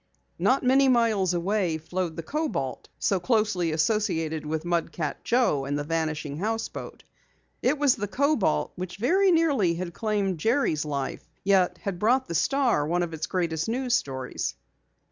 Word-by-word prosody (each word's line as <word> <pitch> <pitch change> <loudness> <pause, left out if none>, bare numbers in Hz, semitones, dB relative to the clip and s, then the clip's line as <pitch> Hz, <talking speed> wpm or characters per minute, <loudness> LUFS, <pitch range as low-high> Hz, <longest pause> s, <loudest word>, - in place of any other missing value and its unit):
Not 265 - +2
many 265 +2 +4
miles 225 -7 +3
away 180 -2 0
flowed 170 +1 -3
the 165 - -5
Kobalt, 290 - -3
so 195 - +1
closely 210 -5 +1
associated 160 -3 0
with 160 +1 -3
Mud 170 -1 0
Cat 155 -4 -4
Joe 235 - +2
and 145 +1 -1
the 145 - -2
Vanishing 155 -2 -2
Houseboat. 225 +3 -4 0.6
It 275 +4 +2
was 285 -3 +4
the 205 -2 -2
Kobalt 225 - +1
which 180 0 -6
very 370 - +3
nearly 285 - +3
had 175 0 -5
claimed 200 -5 -1
Jerry's 220 - +1
life, 140 -2 -4
yet 185 -2 +3
had 195 -3 -3
brought 250 +6 +2
the - - -4
Star 245 - +2
one 175 +2 +1
of 170 -1 -4
its 160 0 -3
greatest 170 -1 -1
news 250 +1 -1
stories. 130 - -2
185 Hz, 160 wpm, -26 LUFS, 160-235 Hz, 0.6 s, many